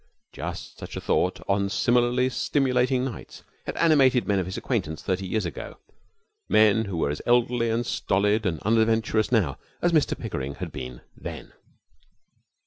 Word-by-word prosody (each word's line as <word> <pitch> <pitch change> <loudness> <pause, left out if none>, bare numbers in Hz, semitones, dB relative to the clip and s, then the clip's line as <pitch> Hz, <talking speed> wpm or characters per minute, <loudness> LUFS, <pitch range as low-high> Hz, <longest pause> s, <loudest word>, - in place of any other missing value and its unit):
Just - - -7
such - - -7
a - - -2
thought - - 0
on 100 0 +1
similarly 120 +3 +2
stimulating 130 0 +1
nights 125 -5 -8 0.2
had - - -4
animated 135 -6 +4
men 100 -2 +2
of 90 - -2
his 95 - -5
acquaintance 80 +1 -2
thirty 95 0 -1
years 110 +3 -1
ago, - - -6 0.7
men 110 +1 +4
who 95 -4 -4
were 70 -3 +1
as 75 - -5
elderly 120 -1 +3
and 115 +2 0
stolid 105 +2 +1
and 80 -3 -2
unadventurous 110 0 +2
now 95 - +1 0.2
as 175 - +2
Mr 155 -3 +2
Pickering 65 +1 -4
had - - -6
been 65 -2 -7
then. - - -8
110 Hz, 155 wpm, -25 LUFS, 95-125 Hz, 0.7 s, animated